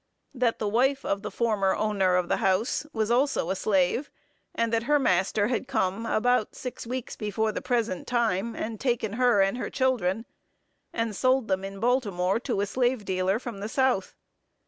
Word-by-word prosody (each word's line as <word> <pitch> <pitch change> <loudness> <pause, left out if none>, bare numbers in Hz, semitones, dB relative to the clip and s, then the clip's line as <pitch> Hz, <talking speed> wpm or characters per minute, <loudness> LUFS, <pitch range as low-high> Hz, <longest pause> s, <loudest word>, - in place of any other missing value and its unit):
That 245 -3 +1
the 215 - -2
wife 265 +6 +1
of 200 0 -1
the 210 - -4
former 210 -5 +1
owner 195 -4 +1
of 180 -1 +1
the - - +1
house 195 +10 0
was 220 -3 -1
also 250 - +1
a - - 0
slave; 195 +7 +1 0.5
and 230 0 0
that 225 0 +1
her 295 - +5
master 205 -4 +2
had 250 +1 -1
come 195 +5 -1
about 245 0 +1
six 250 -2 -7
weeks 255 0 -4
before 215 +1 -1
the - - -4
present 230 -7 -1
time, 230 -2 0
and 220 -1 -4
taken 235 -5 -1
her 240 -4 +4
and 195 +6 -1
her - - -3
children, 230 -6 0 0.7
and 230 -2 -2
sold 255 +1 +2
them 190 0 0
in 195 0 -6
Baltimore 205 -5 +1
to 240 -5 -2
a - - +1
slave 245 0 0
dealer 185 +1 +1
from 235 -4 -7
the 210 +2 -4
South. 260 -6 +1
220 Hz, 185 wpm, -27 LUFS, 195-245 Hz, 0.7 s, her